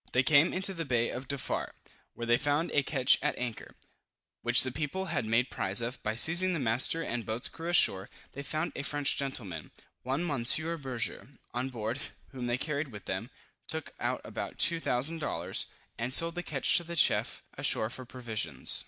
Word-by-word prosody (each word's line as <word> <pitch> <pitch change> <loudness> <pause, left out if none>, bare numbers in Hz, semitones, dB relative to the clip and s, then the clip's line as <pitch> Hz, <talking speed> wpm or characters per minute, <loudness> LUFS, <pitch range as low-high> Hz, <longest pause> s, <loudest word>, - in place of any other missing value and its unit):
They 125 - +3
came 145 +4 +5
into 190 +1 +4
the 165 -2 -4
bay 120 -5 0
of 130 +1 -6
Defarr, 140 -1 -3 0.4
where 120 - -5
they 120 +1 +3
found 145 +3 0
a 145 - +3
ketch 135 -1 +3
at - - -1
anchor, 120 -3 -6 0.7
which - - +6
the 130 - -2
people 155 +8 -3
had 135 - -1
made 115 +3 +1
prize 95 +4 0
of, 120 +2 -3
by 110 +1 -2
seizing 175 +9 +5
the - - -2
master 130 +7 +3
and 120 -5 -3
boat's 110 +3 0
crew 165 +1 -7
ashore. 95 - +3 0.2
They 140 - -7
found 155 +4 -3
a - - -3
French 145 0 0
gentleman, 105 - -5 0.3
one 135 +7 -2
Monsieur 155 +3 +2
Berger, 130 -6 -2 0.3
on 125 +2 -2
board, 115 +1 -4 0.3
whom 125 -3 -6
they 120 0 0
carried 145 +2 -2
with 105 -6 -11
them, - - -4 0.4
took - - -3
out - - -2
about - - -6
2000 165 -2 +2
dollars, 150 - -1 0.3
and 120 +2 -2
sold 165 +5 +3
the 175 - -4
ketch 145 -6 +3
to 175 - -2
the 170 0 -7
chief 165 - +2
ashore 110 +1 +2
for 130 - -7
provisions. 110 - -2
130 Hz, 190 wpm, -30 LUFS, 120-155 Hz, 0.7 s, which